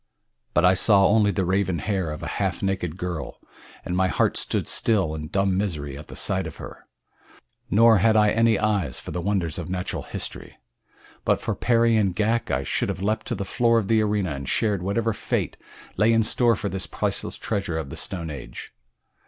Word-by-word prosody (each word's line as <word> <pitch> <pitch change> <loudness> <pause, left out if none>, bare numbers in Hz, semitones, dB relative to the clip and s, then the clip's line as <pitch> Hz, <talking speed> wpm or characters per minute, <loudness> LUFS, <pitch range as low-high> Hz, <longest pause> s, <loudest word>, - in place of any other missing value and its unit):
But 85 - +4
I 90 - +6
saw 100 +1 +4
only 105 0 +4
the 95 -2 0
raven 95 -1 0
hair 95 0 -2
of 75 -1 -6
a - - -3
half - - -1
naked 90 -4 -2
girl, 90 -3 -5 0.5
and 90 - -2
my 95 0 +2
heart - - +1
stood - - -1
still 95 -8 +1
in 75 0 -5
dumb 95 +2 +1
misery 80 -8 -2
at 75 +1 -10
the - - -10
sight 95 -2 +1
of 80 - -9
her, - - -11 0.8
nor 115 0 +5
had 110 +3 +4
I 105 -1 +4
any 115 -1 +3
eyes 100 - 0
for - - -8
the 90 - -3
wonders 90 -4 -1
of 85 - -6
natural 90 -1 -3
history. - - -5 0.7
But - - +2
for - - -2
Perry 115 -1 +2
and 100 -4 +1
Ghak 110 +3 0
I 65 +1 0
should - - -1
have 95 - -4
leaped 110 +2 -1
to - - -2
the 100 - -4
floor 115 +3 +2
of 105 -4 -1
the 110 -1 +4
arena 105 -4 0
and 70 -2 -5
shared 105 -4 +1
whatever 110 +4 0
fate - - -2 0.4
lay 105 +3 +4
in 115 -1 +3
store 120 +1 +3
for 100 - -4
this 95 -2 -3
priceless - - -2
treasure 100 -6 -2
of 75 -4 -5
the - - -6
Stone 85 -5 -4
Age. - - -9
95 Hz, 205 wpm, -24 LUFS, 85-110 Hz, 0.8 s, I